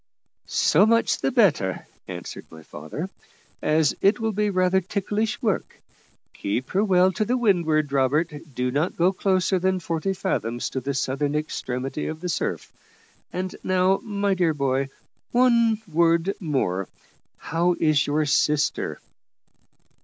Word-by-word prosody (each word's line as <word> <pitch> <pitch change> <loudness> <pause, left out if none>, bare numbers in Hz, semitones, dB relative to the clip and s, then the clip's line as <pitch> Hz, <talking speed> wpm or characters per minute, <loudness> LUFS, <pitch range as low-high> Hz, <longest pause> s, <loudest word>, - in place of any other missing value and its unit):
"So 205 - +4
much 230 +1 +2
the - - 0
better," 190 - +2 0.2
answered - - -8
my 80 -1 -13
father, 80 - -6 0.5
"as 155 -1 +2
it 205 +3 +3
will 225 -1 0
be 210 0 0
rather 185 0 +2
ticklish 205 +4 -2
work. 210 -4 -1 0.5
Keep 105 +6 -3
her 195 +2 +2
well 185 -2 +4
to 215 +7 0
windward, 165 - +2
Robert; 140 +4 +1 0.2
do 125 0 -1
not 150 +7 -1
go 180 +3 +3
closer 185 -1 +1
than 185 +1 +1
forty 170 +2 -2
fathoms 120 - -2
to 130 - -2
the 135 +2 -3
southern 140 +2 -1
extremity 135 -2 -3
of 155 0 -5
the 180 +1 -4
surf. - - -3 0.6
And 185 0 -4
now, 185 +1 +2
my 200 -2 -1
dear 175 -4 +1
boy, 135 -1 0 0.4
one 235 -3 +4
word 170 +3 +2
more. 130 - -1 0.5
How 170 +3 0
is 155 -2 +3
your 150 +1 +1
sister?" 150 0 +1
170 Hz, 140 wpm, -24 LUFS, 145-195 Hz, 0.6 s, So